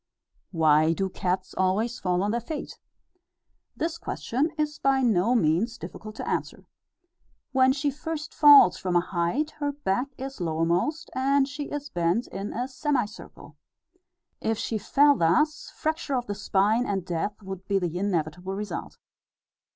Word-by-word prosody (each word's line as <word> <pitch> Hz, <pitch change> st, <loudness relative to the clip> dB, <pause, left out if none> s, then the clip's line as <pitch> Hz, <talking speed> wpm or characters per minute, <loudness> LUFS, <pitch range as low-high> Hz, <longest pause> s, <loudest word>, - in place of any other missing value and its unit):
Why 155 Hz, -2 st, +4 dB
do 190 Hz, +2 st, -1 dB
cats 185 Hz, 0 st, -2 dB
always 205 Hz, +6 st, 0 dB
fall 180 Hz, 0 st, 0 dB
on 205 Hz, -, 0 dB
their 235 Hz, +1 st, -1 dB
feet? 295 Hz, +6 st, -6 dB, 1.0 s
This 335 Hz, 0 st, -2 dB
question 270 Hz, +7 st, -1 dB
is 300 Hz, 0 st, -2 dB
by 270 Hz, -1 st, +2 dB
no 225 Hz, 0 st, +3 dB
means 215 Hz, +4 st, +1 dB
difficult 215 Hz, 0 st, -9 dB
to -, -, -6 dB
answer. -, -, -3 dB, 0.9 s
When 260 Hz, 0 st, +4 dB
she 285 Hz, +1 st, 0 dB
first 305 Hz, +2 st, -5 dB
falls 285 Hz, -, +8 dB
from 180 Hz, -1 st, -2 dB
a -, -, +6 dB
height, 185 Hz, -, -1 dB
her 290 Hz, -1 st, 0 dB
back 255 Hz, -3 st, -1 dB
is 265 Hz, -5 st, -7 dB
lowermost, 170 Hz, -, 0 dB
and 270 Hz, +1 st, +2 dB
she 290 Hz, +1 st, -5 dB
is 290 Hz, 0 st, -6 dB
bent 175 Hz, +7 st, +1 dB
in 195 Hz, +2 st, -5 dB
a 245 Hz, +2 st, -3 dB
semicircle. 260 Hz, -5 st, -4 dB, 0.8 s
If 225 Hz, 0 st, -1 dB
she 220 Hz, 0 st, -2 dB
fell 285 Hz, +7 st, +4 dB
thus, 285 Hz, -, +1 dB
fracture 315 Hz, -3 st, -1 dB
of 245 Hz, -1 st, -1 dB
the 205 Hz, -, -3 dB
spine, 205 Hz, +4 st, +1 dB
and 195 Hz, -3 st, -2 dB
death, 180 Hz, +4 st, -3 dB
would 190 Hz, 0 st, -8 dB
be 200 Hz, -, +2 dB
the 175 Hz, -2 st, -2 dB
inevitable 180 Hz, -1 st, -2 dB
result. 205 Hz, +1 st, -5 dB
215 Hz, 150 wpm, -26 LUFS, 185-275 Hz, 1.0 s, falls